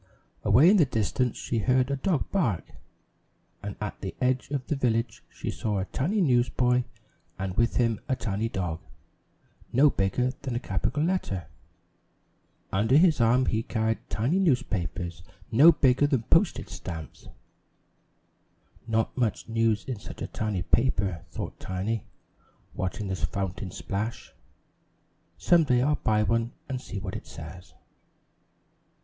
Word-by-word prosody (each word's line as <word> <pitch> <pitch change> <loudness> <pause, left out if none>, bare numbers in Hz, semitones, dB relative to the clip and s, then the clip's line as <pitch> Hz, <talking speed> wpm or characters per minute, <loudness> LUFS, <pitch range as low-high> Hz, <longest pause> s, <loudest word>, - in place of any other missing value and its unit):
Away 155 +9 +6
in 210 - +5
the 165 - +6
distance 120 0 0
she 115 - -2
heard 130 +4 +2
a - - +1
dog 155 +1 -1
bark, 120 - +1 1.0
and 100 -1 -5
at 105 -1 -5
the 95 - -5
edge 130 0 +1
of 140 -3 -2
the 150 - -1
village 115 -4 0
she - - -5
saw 105 -2 -2
a 95 - -1
tiny 190 - 0
newsboy 125 -3 +2 0.5
and 95 -1 -3
with 115 +3 +2
him 115 -3 +2
a 130 - +2
tiny 115 -2 -2
dog, 90 -6 -3 0.9
no 140 +4 +5
bigger 110 +6 +1
than 130 -4 -3
a - - 0
capital 125 +7 -1
letter. 160 - -1 1.3
Under 110 +8 +4
his 160 -5 +5
arm 120 +3 +4
he 110 -2 +1
carried 110 -1 -1
tiny 130 - +1
newspapers 95 - -1 0.3
no 145 +9 +8
bigger 140 -2 +3
than 135 -6 +1
postage - - +2
stamps. 80 -3 -8 1.6
"Not 115 0 0
much 120 -4 -1
news 115 -1 +1
in 125 -6 -4
such - - -8
a - - -3
tiny 105 -5 -2
paper!" 95 -7 +1
thought - - -6
Tiny, 95 +3 -3 0.7
watching 95 +2 -3
the 95 - -1
fountain 95 +2 -3
splash. 100 +5 -4 1.0
"Some 175 -2 +4
day 125 -2 +3
I'll 150 +3 +3
buy 105 -5 +1
one 115 +2 0 0.2
to 130 -1 -2
see 105 - -7
what 95 +1 -5
it 110 - -7
says." 85 +1 -10
115 Hz, 145 wpm, -27 LUFS, 100-130 Hz, 1.6 s, no